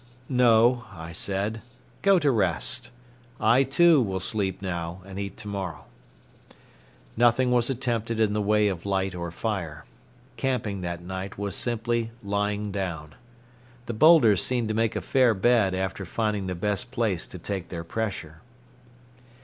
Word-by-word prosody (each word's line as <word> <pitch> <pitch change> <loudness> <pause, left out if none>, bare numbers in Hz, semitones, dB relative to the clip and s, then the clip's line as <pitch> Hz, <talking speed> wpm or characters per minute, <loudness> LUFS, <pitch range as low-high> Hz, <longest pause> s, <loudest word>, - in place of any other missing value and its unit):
"No," 120 -1 +4
I 80 0 -8
said, 100 +5 -2 0.4
"go 195 -1 +5
to 150 -5 +3
rest. 95 - +1 0.5
I, 115 +4 +4
too, 150 +3 +5
will 95 -5 -1
sleep 95 -1 -1
now 90 -2 -4
and 95 0 -8
eat 100 -1 -5
to 105 - -9
morrow." 95 -6 -5 1.3
Nothing 120 +2 +3
was 120 0 +3
attempted 115 -3 -2
in 110 -2 +2
the 105 - 0
way 105 +1 +3
of 95 -4 -3
light 95 -1 0
or 85 -1 -4
fire. 85 -5 -4 0.5
Camping 115 -6 -2
that 85 -1 -5
night 95 +2 -6
was 100 -1 -3
simply 115 -1 0
lying 105 +1 -1
down. 85 -6 -4 0.7
The 120 - -4
boulders 115 - +6
seemed 120 -3 -1
to - - 0
make 115 0 0
a - - -1
fair 125 -4 +3
bed 100 -2 +3
after 95 +1 -3
finding 105 0 -2
the 90 - -3
best 105 +6 -2
place 110 -8 -1
to - - -8
take 95 +1 -5
their 85 -2 -5
pressure. 85 -5 -4
105 Hz, 150 wpm, -26 LUFS, 95-115 Hz, 1.3 s, boulders